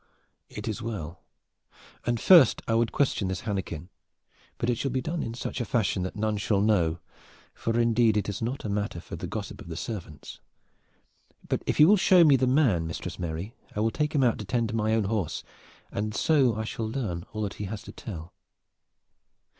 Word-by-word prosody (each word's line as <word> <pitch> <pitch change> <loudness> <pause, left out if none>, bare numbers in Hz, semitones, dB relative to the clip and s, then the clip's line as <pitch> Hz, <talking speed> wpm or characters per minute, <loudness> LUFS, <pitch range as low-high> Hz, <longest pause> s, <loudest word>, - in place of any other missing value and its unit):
"It - - -7
is 110 - -3
well. 95 -7 -5 0.9
And 120 -1 +1
first 165 -6 +6
I 115 - +1
would 115 0 +2
question 125 -8 +1
this 95 -1 -3
Hannekin; 95 -6 -4 0.7
but 115 - -2
it 120 -2 +1
shall 135 - 0
be 130 +1 -1
done 165 +7 -3
in 115 - -4
such 125 +1 -4
a - - +1
fashion 110 -4 0
that 95 +2 -4
none 105 0 0
shall 105 -1 +1
know, 90 -6 +2 0.6
for 115 +1 -1
indeed 115 -2 +3
it 105 - 0
is 100 +1 -4
not 120 +3 -3
a - - -1
matter 100 -3 -2
for - - -8
the - - -5
gossip - - -6
of 80 -1 -7
servants. 85 - -7 1.1
But - - 0
if - - 0
you 150 - +9
will 210 +3 +6
show 180 -2 +6
me 150 -4 +7
the 130 0 +2
man, 125 - +3
Mistress 80 - -6
Mary, 85 +5 -4 0.2
I - - -2
will 110 +1 +2
take 150 +3 -1
him 140 - +4
out 120 -3 +2
to 105 - -5
tend 115 +1 -1
my 110 0 +1
own 110 - +2
horse, 100 -4 -2 0.5
and 105 +1 -3
so 135 -6 +3
I 110 - -2
shall 110 0 -4
learn 105 -9 -3
all 110 0 -3
that 100 - -3
he - - -2
has 105 +2 -6
to - - -9
tell." 85 -6 -8
110 Hz, 200 wpm, -27 LUFS, 95-120 Hz, 1.1 s, you